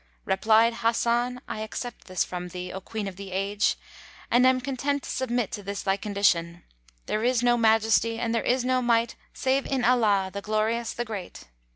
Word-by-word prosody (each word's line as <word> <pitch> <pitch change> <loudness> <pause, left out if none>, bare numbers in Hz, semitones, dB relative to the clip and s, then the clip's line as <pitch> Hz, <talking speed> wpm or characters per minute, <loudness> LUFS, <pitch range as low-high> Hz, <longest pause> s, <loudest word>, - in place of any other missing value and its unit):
Replied 220 +4 +4
Hasan, 235 +2 +1
"I - - -5
accept 230 +3 -6
this 185 -2 0
from 180 0 -5
thee, 180 0 -7
O 190 - -6
Queen 215 +1 -5
of 185 -2 -7
the 195 -1 -8
Age, 200 +2 0 0.5
and 250 +2 +5
am 260 0 +4
content 275 +2 -2
to - - -5
submit 245 -4 -1
to 205 - -5
this 200 0 -5
thy 195 - +2
condition. 185 -5 0 0.4
There 215 - -1
is 245 0 +2
no 240 0 +4
Majesty 225 0 +3
and 230 -1 -1
there 230 - +1
is 250 0 +1
no 255 0 +2
Might 235 -1 +2 0.2
save 270 +1 0
in 260 -3 0
Allah, 210 -6 +3
the 200 - -4
Glorious, 220 +3 0
the 240 - -3
Great!" 205 -5 -7
225 Hz, 190 wpm, -26 LUFS, 200-245 Hz, 0.5 s, and